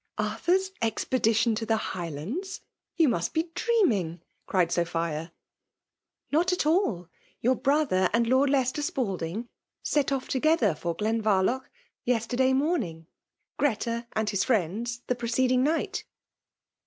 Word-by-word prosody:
*' - - -54
Arthur's 345 - 0
expedition 225 0 +1
to 220 +1 -2
the 225 0 +1
Highlands? 190 - -5 0.2
— - - -63
You 325 -3 +5
must 170 -9 -1
be 325 +1 0
dreaming 210 - +1
!" - - -48
cried 180 -3 +2
Sophia. 165 -2 -1 0.5
" - - -52
Not 340 +5 +3
at 360 - 0
alL 300 - +1 0.3
Your 250 +3 +3
brother 270 -10 +2
and 235 +2 +2
Lord 260 +4 +3
Lei* 275 -1 +3
tester 255 +4 -2
Spalding 210 - -2 0.4
set 290 -2 +1
off 270 -1 -1
together 260 - +2
for 170 +2 -3
Glenvar 215 -2 +1
loch 260 +5 -1 0.3
yesterday 245 +2 +1
morning 260 - 0 0.3
— - - -52
Greta 235 -3 0
and 220 0 0
his 200 -2 +1
friends, 235 +2 -1
the - - +1
preceding 250 +1 +1
night." 315 +4 0
235 Hz, 145 wpm, -27 LUFS, 190-275 Hz, 0.5 s, You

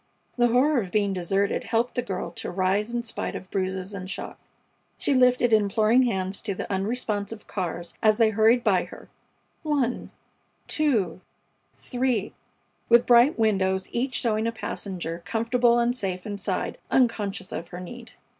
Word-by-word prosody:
The 240 -1 +4
horror 255 +3 +3
of 190 - -6
being 205 -2 +1
deserted 195 +2 0
helped 230 +2 0
the 245 - 0
girl 190 -6 -4
to - - -6
rise 195 +4 0
in 240 0 -2
spite 230 - -4
of 185 - -8
bruises 190 0 -2
and 185 -1 -6
shock. - - -6 0.6
She - - +1
lifted 250 -2 +4
imploring 220 +4 +4
hands 190 -2 -2
to 200 -3 -3
the - - -5
unresponsive 210 +1 -2
cars 175 -2 -4
as 215 -1 +4
they 225 -1 +4
hurried 225 +3 +4
by - - +2
her - - -13 0.5
one, 285 -6 -1 0.6
two, 220 - 0 0.6
three, 250 0 -1 0.6
with 235 +1 +6
bright 245 +5 +5
windows, 190 -4 +1
each 255 +1 -2
showing 220 -1 0
a - - 0
passenger, 180 -6 -5
comfortable 235 +1 +2
and 240 +1 +2
safe 185 -6 -3
inside, 205 -2 -3
unconscious 205 -6 0
of 170 - -5
her 175 +1 -8
need. 235 +6 -10
220 Hz, 155 wpm, -25 LUFS, 190-240 Hz, 0.6 s, with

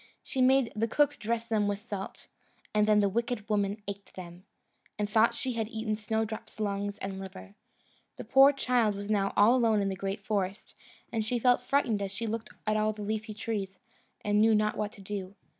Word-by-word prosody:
She 260 - -2
made 260 -1 +4
the 225 +2 +1
cook 290 +5 +2
dress 230 +1 -1
them 215 -3 +1
with 205 0 0
salt, 205 -2 -7 0.5
and 210 0 +3
then 210 -1 +5
the 200 - +3
wicked 230 +1 -2
woman 205 0 0
ate 200 0 -7
them, 180 0 -10 0.5
and 210 -1 0
thought 225 +3 +3
she 255 +2 -2
had 225 -2 -2
eaten 220 -1 -2
Snowdrop's 220 +1 -3
lungs 205 -1 -2
and 195 -1 -5
liver. 100 - -9 0.6
The - - -7
poor 270 +4 +7
child 245 -6 +1
was 200 +1 -4
now 195 -2 +2
all 215 +5 +6
alone 225 -4 +3
in 200 -1 0
the 190 - -2
great 195 +2 -4
forest, 200 -2 -2 0.4
and 225 -2 0
she 240 +3 -1
felt 245 +1 +3
frightened 245 -5 +1
as 195 -1 -3
she 200 +4 -4
looked 225 0 -3 0.2
at 215 0 +1
all 215 0 +1
the 210 0 -7
leafy 215 +1 -3
trees, 200 -3 -4 0.5
and 210 0 +3
knew 220 0 +5
not 215 0 +1
what 210 -1 -2
to 200 - -13
do. 195 -1 -6
215 Hz, 205 wpm, -29 LUFS, 200-230 Hz, 0.6 s, poor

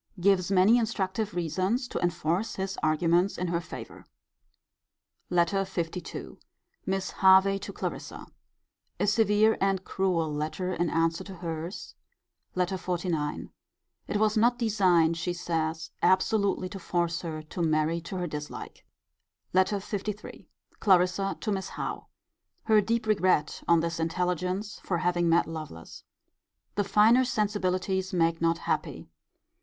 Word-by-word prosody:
Gives 185 0 +3
many 200 +5 +5
instructive 210 -3 -2
reasons 185 - 0
to - - -3
enforce 175 +3 -1
his 195 0 -3
arguments 170 +4 +2
in 180 0 -2
her 170 0 0
favour. - - -9 1.3
LETTER 180 +2 +2
LII. 180 -2 -4 0.5
Mrs. 190 0 -1
Hervey 190 +1 +6
to 200 - -7
Clarissa. - - -5 0.7
A - - +2
severe 210 +1 +3
and 195 -1 +1
cruel 170 -5 0
letter 155 +5 -2
in 175 -1 0
answer 165 +1 0
to 195 - -9
her's, 170 +1 -6 0.6
Letter 185 +1 0
XLIX. 175 -5 -2 0.6
It - - -1
was 215 +1 +2
not 240 +2 +3
designed, 185 -8 +3
she 175 +1 -2
says, 160 -2 -2
absolutely 195 0 +2
to 195 - -7
force 170 -1 -1
her 155 -2 -5
to 155 +3 -6
marry 160 +1 +1
to 180 +3 -6
her 180 - -2
dislike. 150 -2 -7 0.7
LETTER 190 +2 +3
LIII. 210 +1 -5 0.3
Clarissa 190 0 +2
to 215 - -1
Miss 190 -1 -2
Howe. - - -5 0.6
Her 215 -2 +4
deep 230 +2 -1
regret 185 -7 +1
on 170 -1 +5
this 165 0 -2
intelligence, 180 +4 -2
for 175 - -2
having 175 -1 +1
met 170 +1 +4
Lovelace. 155 - -8 0.7
The 205 - +1
finer 225 +6 +5
sensibilities 190 -4 -1
make 165 -2 +1
not 165 0 +2
happy. - - -3
185 Hz, 130 wpm, -28 LUFS, 170-200 Hz, 1.3 s, Hervey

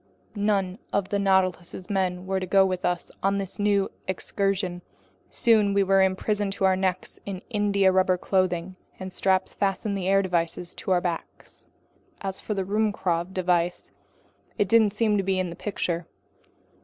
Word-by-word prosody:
None 200 -2 0
of 200 -1 0
the 200 - 0
Nautilus's 185 -2 0
men 185 -3 -1
were 190 0 -1
to 185 - -4
go 195 +1 +5
with 185 -1 -2
us 175 -1 -1
on 195 +1 +1
this 195 +1 -5
new 205 -1 +2 0.2
excursion. 190 -1 -1 0.5
Soon 215 -4 +3
we 200 - +4
were 195 0 +4
imprisoned 195 +1 0
up - - -13
to - - -3
the 190 -1 +5
neck 185 -1 -1 0.2
in 190 -1 -5
india 200 -3 +3
rubber 185 0 +3
clothing, 185 -1 0 0.2
and 185 -1 -6
straps 190 0 +1
fastened 200 +1 -1
the 190 -2 -2
air 195 0 +4
devices 175 -1 -2
onto - - -7
our 180 -1 +3
backs. 170 -2 -6 0.5
As 195 -1 -5
for 210 - -3
the 195 - -1
Ruhmkorff 190 -4 0
device, 175 -2 0 0.7
it 205 - +2
didn't 220 +1 +5
seem 210 0 +1
to 195 - 0
be 190 0 0
in 185 -2 -1
the - - -7
picture. 175 -4 -3
190 Hz, 170 wpm, -26 LUFS, 185-200 Hz, 0.7 s, go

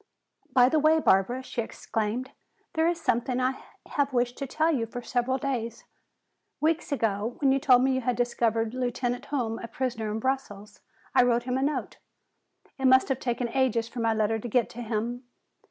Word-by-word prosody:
"By 250 -1 +6
the 310 +4 +2
way, 310 +2 +4
Barbara," 240 +2 +2
she 245 - -3
exclaimed, 225 +2 -3 0.4
"there 320 -1 +2
is 340 0 0
something 245 0 0
I 255 +1 0 0.3
have 285 -1 0
wished 245 -1 0
to 275 - -3
tell 315 +5 +1
you 230 -5 -1
for 245 +2 -7
several 250 +2 0
days! 235 -4 -3 0.8
Weeks 315 0 0
ago 225 -3 -1
when 275 -2 +3
you 270 - +3
told 255 -3 +5
me 265 - +3
you 260 - 0
had 245 0 0
discovered 230 -2 0
Lieutenant 245 -1 -2
Hume 235 -6 -2
a 230 - -6
prisoner 230 -4 -3
in 210 - -2
Brussels, 220 -5 -3 0.3
I - - +6
wrote 240 -1 +2
him 250 0 -2
a 265 - 0
note. 290 +2 -2 0.8
It 265 - -1
must 260 +1 +5
have 265 -1 0
taken 240 0 -1
ages 235 -3 +1
for 240 +1 -8
my 230 -1 +2
letter 220 +1 +1
to 240 - -6
get 240 0 +1
to 240 - -7
him. 235 +2 -3
245 Hz, 190 wpm, -27 LUFS, 230-265 Hz, 0.8 s, By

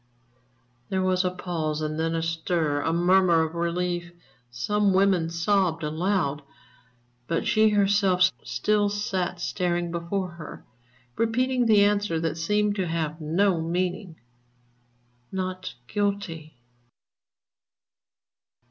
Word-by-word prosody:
_" - - -40 0.9
There 190 -1 0
was 185 0 +2
a 180 - +1
pause, 165 -4 -3
and 155 0 -3
then 165 0 0
a 165 - -1
stir, 165 -3 -1
a 160 - 0
murmur 175 -1 +4
of 160 0 -4
relief. 175 +1 -2 0.4
Some 200 - +1
women 190 -4 +3
sobbed 170 -1 +1
aloud. 155 -1 0 0.9
But 165 - -1
she 215 0 +4
herself 195 -3 +3
still 205 +13 +1
sat 190 -4 -2
staring 175 -1 -1
before 175 +3 -2
her, 165 -3 -10 0.5
repeating 245 +2 +1
the 210 -2 +6
answer 205 -5 +1
that 160 -1 -2
seemed 210 +4 +1
to 185 -2 -1
have 160 -1 -3
no 170 +3 +1
meaning: 175 +2 -2 1.2
"_Not 185 -3 -4
Guilty. 190 - -3
180 Hz, 115 wpm, -25 LUFS, 165-200 Hz, 1.2 s, the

